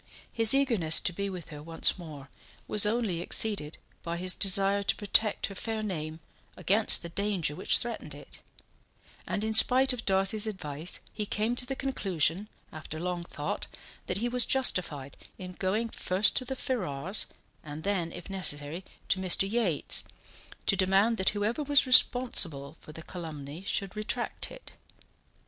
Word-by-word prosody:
His 225 +2 +6
eagerness 225 - +4
to 180 - -1
be 200 +3 -3
with 180 -4 -8
her 150 -2 -9
once 165 +4 -1
more 145 -5 -10 0.4
was 210 0 +4
only 210 -6 -1
exceeded 175 -6 0 0.2
by 170 0 -4
his 180 +1 +1
desire 195 +1 +3
to 200 - 0
protect 210 +1 +1
her - - -6
fair 220 +2 -4
name 160 -5 -5 0.4
against 210 +1 +4
the 170 - -7
danger 190 -5 -1
which - - +3
threatened 225 - -5
it; 145 - -14 0.9
and 205 - -2
in 220 0 -1
spite 255 +4 +5
of 235 -3 -5
Darcy's 195 +2 +1
advice 160 -5 -5
he 210 -1 -4
came 220 +4 -1
to 250 0 0
the 270 - -3
conclusion, 195 - -1 0.2
after 155 0 -8
long 175 0 -3
thought, 150 -3 -5 0.4
that 180 - -2
he 235 +4 -1
was 245 0 +4
justified 170 - +1 0.2
in 185 -1 -8
going 195 +5 -1
first 190 -1 +2
to 255 - 0
the 265 - -4
Ferrars's 190 - -1 0.4
and 150 +1 -8
then, 185 -4 -1
if 175 0 -9
necessary, 170 -3 -2 0.3
to 190 - +2
Mr. 190 +1 +2
Yates, 200 -8 0 0.6
to - - +2
demand 195 +4 +2
that 190 - +3
whoever 215 +8 -1
was 290 -1 +3
responsible 180 - +3
for - - -12
the 160 +1 -9
calumny 155 -3 -8
should 195 -2 -2
retract 220 +3 -4
it. - - -12
195 Hz, 160 wpm, -29 LUFS, 165-220 Hz, 0.9 s, His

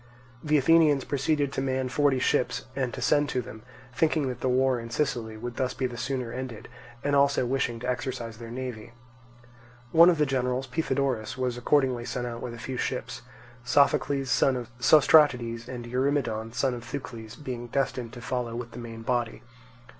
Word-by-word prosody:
The 150 0 +3
Athenians 150 -1 +4
proceeded 140 0 0
to 135 - -1
man 130 -1 -1
forty 140 +1 +2
ships 125 - 0
to 130 -1 -3
send 145 +1 +3
to 130 - -1
them, 110 0 -10 0.3
thinking 155 0 +1
that 125 - -6
the 130 - +1
war 130 0 +2
in 115 0 -7
Sicily 115 -4 -2
would 120 +2 -6
thus 130 -2 -1
be 130 - -1
the 125 -1 -3
sooner 125 -1 -3
ended, 125 -4 -6 0.4
and 145 0 +1
also 140 -2 +3
wishing 120 -2 -1
to 125 - -4
exercise 125 -3 -3
their 115 -1 -8
navy. 120 -2 -6 1.0
One 170 +2 +8
of 175 - +2
the 150 - +3
generals, 130 -1 -1
Pythodorus, 130 -7 -1
was 125 -2 -1
accordingly 125 -1 +1
sent 125 0 -3
out 120 -1 -5
with 120 -1 -5
a - - -10
few 125 +3 -5
ships; 125 0 -3 0.4
Sophocles, 140 +1 +2
son 135 - +3
of 120 -2 -6
Sostratides, 125 -4 +5
and 120 -2 -6
Eurymedon, 120 -3 -1
son 125 +2 0
of 120 -1 -6
Thucles, 120 -3 -7
being 125 -4 -6
destined 125 -2 -2
to 120 - -9
follow 125 -2 -3
with 120 -1 -6
the - - -9
main 115 -1 -8
body. 120 -1 -1
125 Hz, 180 wpm, -27 LUFS, 120-140 Hz, 1.0 s, One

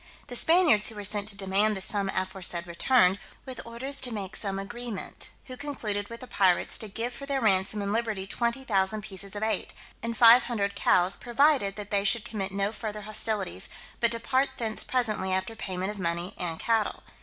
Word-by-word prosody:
The 245 - -5
Spaniards 320 - +5
who 225 - -10
were 205 - -6
sent 205 +1 0
to 205 - -4
demand 200 +2 +2
the - - -4
sum 195 0 +2
aforesaid 185 -2 -2
returned, 185 +2 +3 0.3
with 260 -3 -7
orders 265 +4 -3
to 250 -2 0
make 205 -2 -5
some 195 -3 -2
agreement; 225 +1 -6 0.2
who 255 - -8
concluded 220 -8 -4
with 230 0 -8
the 255 - -8
pirates 185 -6 +2
to 220 - -2
give 230 +4 -3
for 275 - -8
their 275 -1 0
ransom 205 -2 +2
and 200 +1 -1
liberty 220 -4 -1
20,000 215 -3 0
pieces 195 -1 -4
of 205 - -3
eight, 220 0 -1 0.3
and 230 0 -3
five 235 +2 +8
hundred 200 -4 -1
cows, 180 -1 +2
provided 245 -4 +2
that 210 -1 -8
they 200 -1 +2
should 215 +3 +2
commit 195 -4 -3
no 200 +1 0
farther 215 -1 -5
hostilities, 210 - -1 0.3
but 235 - +3
depart 260 +4 +1
thence 220 -2 -1
presently 215 -7 -1
after 190 +4 -1
payment 190 -2 -3
of 210 - -9
money 170 +1 -2
and 165 -2 -3
cattle. 225 -2 0
210 Hz, 190 wpm, -28 LUFS, 195-235 Hz, 0.3 s, five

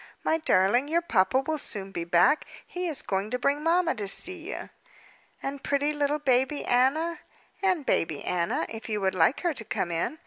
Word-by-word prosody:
"My 320 - +1
darling, 245 - +3
your 335 +3 +1
papa 235 - +2
will 310 +3 -2
soon 195 -6 -3
be 170 -3 -4
back. 175 - +3 0.2
He 360 0 -4
is 310 -5 -2
going 195 +1 -2
to 250 - -1
bring 280 +3 0
mamma 335 +2 +2
to 210 -4 -4
see 355 - -1
you." - - -6 0.7
"And 275 0 -5
pretty 285 +1 0
little 295 0 0
baby 265 0 +1
Anna?" 310 +8 +2 0.4
"And 370 -7 +1
baby 160 -9 0
Anna, 170 -1 0
if 225 +1 -8
you 210 -1 -1
would 190 -1 0
like 185 - +3
her 345 -2 0
to 255 - -1
come 175 -4 -3
in. 170 - -2
275 Hz, 195 wpm, -27 LUFS, 200-315 Hz, 0.7 s, darling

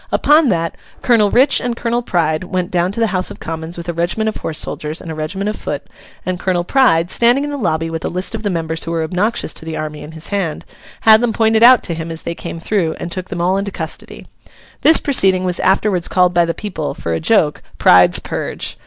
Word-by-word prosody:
Upon 300 -1 +4
that, 165 -3 -1 0.3
Colonel 225 -5 +3
Rich 255 +7 +4
and 240 -1 -3
Colonel 235 +1 -1
Pride 165 -6 -1
went 185 +1 -3
down 180 0 +1
to 230 - -4
the 230 - +3
House 185 0 +2
of - - -10
Commons 160 +1 -6
with 170 0 -7
a 170 - -2
regiment 175 +6 -1
of 215 - -6
horse 155 - -4
soldiers 155 +1 -4
and 165 - -7
a - - -4
regiment 155 +6 -4
of 210 - -2
foot; - - -5 0.4
and 185 -1 -3
Colonel 180 -2 0
Pride, 175 -7 +2
standing 240 +4 +3
in 290 - -3
the - - -3
lobby 165 - -1
with 165 0 -5
a - - -2
list 185 +5 -2
of 225 - -4
the 210 - -2
members 165 -2 -3
who - - -5
were 165 -1 -1
obnoxious 180 +2 0
to - - -5
the 160 0 -5
army 150 -1 -5
in 155 - -10
his 160 0 -8
hand, 190 -6 -3 0.4
had 220 0 +6
them 240 -2 0
pointed 220 0 +2
out 245 +1 +7
to 170 - -2
him 165 0 -5
as 165 0 -7
they 170 - -3
came 165 - -7
through, 165 -3 -1
and 170 - -6
took 185 +1 -4
them 175 -3 -4
all 185 +2 +1
into 200 +1 -2
custody. - - -7 0.6
This 320 - +6
proceeding 190 -9 +3
was 180 -1 -1
afterwards 190 -2 +1
called 180 -1 +2
by 175 -1 +3
the 165 - -3
people, 180 -8 -5
for 85 - -4
a 80 - -1
joke, 80 - +2 0.2
Pride's 90 -1 +6
Purge. - - -4
180 Hz, 240 wpm, -17 LUFS, 165-215 Hz, 0.6 s, out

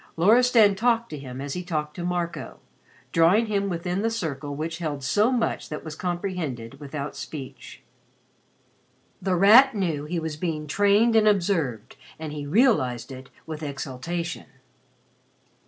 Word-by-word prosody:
Loristan 220 +3 +5
talked 230 +3 +1
to 150 - -5
him 130 -2 -8
as 140 0 -4
he 180 - -3
talked 155 -4 -3
to 175 - -5
Marco, 175 -1 -3 0.5
drawing 175 +8 +4
him 200 -2 -1
within 180 +2 -2
the 225 - +1
circle 145 -10 -4
which 165 +3 -4
held 150 -5 -4
so 210 - +2
much 240 -3 -1
that 150 - -6
was 155 - -6
comprehended 175 - -4
without 145 0 -6
speech. 135 -4 -9 1.4
The 190 -2 0
Rat 225 +8 +7
knew 170 -7 -1
that 150 - -11
he 175 - 0
was 160 -2 -4
being 155 -2 -3
trained 205 +8 +3
and 215 -1 +5
observed 170 - 0 0.2
and 155 -2 -6
he 145 -1 -5
realized 140 - +2
it 130 0 -10 0.2
with 155 -1 -7
exaltation. 150 +4 -5
170 Hz, 150 wpm, -25 LUFS, 145-200 Hz, 1.4 s, Rat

